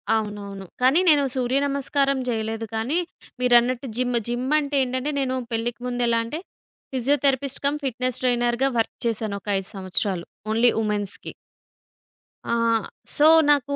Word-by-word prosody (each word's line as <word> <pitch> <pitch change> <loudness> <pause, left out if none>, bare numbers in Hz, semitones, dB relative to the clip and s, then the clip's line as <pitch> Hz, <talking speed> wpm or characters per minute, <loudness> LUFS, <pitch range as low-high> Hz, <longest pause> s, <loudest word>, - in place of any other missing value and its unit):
అవునవును. 205 -2 -4 0.2
కానీ 265 +7 +5
నేను 290 -2 +5
సూర్యనమస్కారం 275 +1 +1
జేయలేదు 225 -1 -2
కానీ, 250 +10 0 0.4
మీరన్నట్టు 250 +1 +3
జిమ్, 245 -1 +1
జిమ్ 240 +2 -2
అంటే 285 -1 -3
ఏంటంటే, 260 +3 -2
నేను 260 -1 0 0.2
పెళ్ళికి 230 +1 -2
ముందెలా 240 -2 +1
అంటే, 300 +8 -5 0.5
ఫిజియోథెరపిస్ట్ 275 +1 +1
కమ్ 290 +1 +1
ఫిట్నెస్ 255 -1 -2
ట్రైనర్‌గా 240 +1 +2
వర్క్ 225 - -1
చేశాను 215 -3 -2
ఒక - - -24
5 195 - -6
సంవత్సరాలు 185 -1 -2 0.3
ఓన్లీ 230 +2 +4
ఉమెన్స్‌కి. 210 -2 -2 1.2
ఆహ్, 230 -1 +2 0.3
సో, 300 +1 +5 0.2
నాకు 285 -1 +1
245 Hz, 125 wpm, -24 LUFS, 225-275 Hz, 1.2 s, కానీ